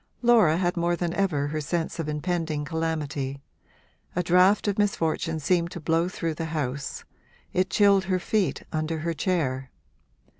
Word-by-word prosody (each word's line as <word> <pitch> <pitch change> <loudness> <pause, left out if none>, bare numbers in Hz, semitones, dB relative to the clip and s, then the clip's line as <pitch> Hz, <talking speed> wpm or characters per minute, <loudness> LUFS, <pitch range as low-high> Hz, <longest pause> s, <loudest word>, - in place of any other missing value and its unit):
Laura 220 -10 +5
had 180 0 0
more 175 0 +1
than 170 -1 -2
ever 155 -8 0
her 155 +1 -2
sense 165 +2 -2
of 155 -2 -2
impending 155 -1 -2
calamity; 150 -4 -2 0.8
a 180 - +1
draught 180 +5 +4
of 205 0 0
misfortune 165 -5 0
seemed 170 +3 +1
to 170 - -7
blow 165 +2 +1
through 165 -3 -3
the 165 +1 -4
house; 140 -4 -3 0.5
it 185 +1 +1
chilled 200 -2 +4
her 185 0 +1
feet 195 +1 0
under 155 +1 -1
her 165 +2 -2
chair. 135 -7 -1
165 Hz, 155 wpm, -26 LUFS, 155-180 Hz, 0.8 s, Laura